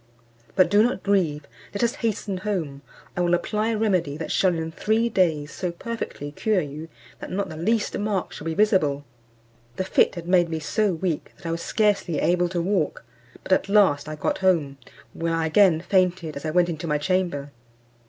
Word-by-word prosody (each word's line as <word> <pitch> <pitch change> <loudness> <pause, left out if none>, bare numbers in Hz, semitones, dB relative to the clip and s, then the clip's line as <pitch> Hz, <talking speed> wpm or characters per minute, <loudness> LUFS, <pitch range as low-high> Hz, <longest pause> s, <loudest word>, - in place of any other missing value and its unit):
But 185 -1 +4
do 205 +1 +6
not 225 -4 0
grieve; 170 -7 +1 0.3
let 200 - -1
us 235 +1 +2
hasten 210 -4 -1
home, 175 -9 -3 0.3
I 180 - -1
will 175 0 +3
apply 210 +5 -1
a 225 -1 0
remedy 185 -9 0
that 160 - -5
shall 185 -3 +2
in 160 0 -3
three 220 +7 +1
days 160 -8 +1
so 180 -2 -3
perfectly 170 -6 -6
cure 210 +6 +1
you, 155 +1 -6 0.3
that - - -7
not 195 0 -2
the 160 - -7
least 210 +7 0
mark 205 -3 -2
shall 150 - -9
be 165 -1 -2
visible." 155 -9 +2 0.7
The - - -1
fit 190 - +2
had 170 -1 -7
made 175 -2 +3
me 160 - -2
so 205 +6 0
weak, 170 -2 -3
that - - -18
I 165 - -2
was 165 0 -3
scarcely 205 -7 +1
able 175 +3 +2
to 175 -1 -2
walk. 180 - -1 0.4
But - - -8
at 190 +1 +2
last 190 -9 +3
I 155 - -4
got 150 - -2
home, 160 -8 +1 0.3
where 165 0 -1
I 165 -1 0
again 165 0 +4
fainted, 180 -4 +1
as 140 - -7
I - - 0
went 175 +2 +3
into 165 0 -4
my 150 -1 +1
chamber. 150 -3 -1
175 Hz, 200 wpm, -24 LUFS, 160-200 Hz, 0.7 s, do